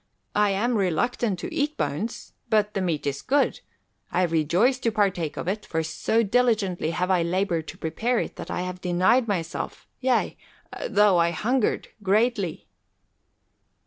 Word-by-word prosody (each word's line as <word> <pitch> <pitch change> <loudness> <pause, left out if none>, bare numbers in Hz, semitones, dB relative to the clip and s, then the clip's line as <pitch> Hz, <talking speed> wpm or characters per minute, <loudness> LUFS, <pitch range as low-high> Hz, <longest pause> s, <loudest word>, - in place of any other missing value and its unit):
I 210 0 +3
am 220 +5 +1
reluctant 195 +3 0
to - - -5
eat 295 +1 -1
bones. 150 +11 -3 0.2
But 210 -1 +2
the 195 - -1
meat 170 -5 -1
is 140 -1 -2
good. 285 +1 +1 0.5
I 180 +1 +2
rejoice 175 - +2
to 230 - 0
partake 190 -7 0
of - - -4
it, 210 +3 -1
for 160 0 -2
so 220 +8 0
diligently 215 -7 +1
have 180 +3 -1
I 180 -2 +3
laboured 170 -1 0
to - - -8
prepare 225 +10 -1
it - - -2
that - - -7
I - - -2
have 180 0 -5
denied 185 +8 +3
myself, 170 -5 -3
yea, 255 -2 +1 0.5
though 205 -3 +4
I 170 0 +4
hungered 225 +8 0
greatly." 205 -2 +1
195 Hz, 155 wpm, -25 LUFS, 170-230 Hz, 0.5 s, though